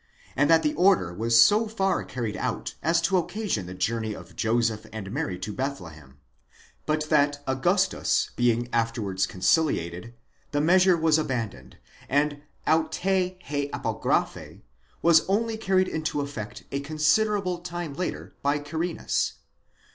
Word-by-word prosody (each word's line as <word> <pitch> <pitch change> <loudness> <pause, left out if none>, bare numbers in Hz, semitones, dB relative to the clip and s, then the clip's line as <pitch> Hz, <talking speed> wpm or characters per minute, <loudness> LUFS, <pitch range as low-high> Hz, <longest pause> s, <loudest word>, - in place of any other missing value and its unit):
and 145 +3 +2
that 165 -1 +5
the 150 - +1
order 180 - +3
was 115 +4 +3
so 210 - +6
far 195 -4 0
carried 115 -5 -4
out - - -3
as 170 +2 +2
to 185 +3 +2
occasion 180 - -2
the 90 - -7
journey 110 +3 -1
of 85 -2 -12
Joseph 115 -1 0
and 105 -3 -6
Mary 90 -3 -2
to 105 +3 -5
Bethlehem; 85 - -6 0.7
but 155 0 0
that 145 -1 +2
Augustus 175 +9 +1
being 120 0 +1
afterwards 110 -5 0
conciliated, 105 - 0 0.3
the 145 - -1
measure 180 +3 +5
was 160 -1 +3
abandoned, 115 - -4 0.3
and 145 +1 +1 0.2
αὐτὴ 180 +3 0
ἡ 145 0 -2
ἀπογραφὴ - - -2 0.4
was: 165 -1 +6
only 225 +3 +1
carried 190 -4 +1
into 155 -2 -2
effect 130 -7 -6
a 140 - -1
considerable 180 +6 +1
time 175 -3 -5
later, 180 +5 -4
by 145 +1 +1
Quirinus. 160 +4 -2
145 Hz, 135 wpm, -26 LUFS, 115-175 Hz, 0.7 s, so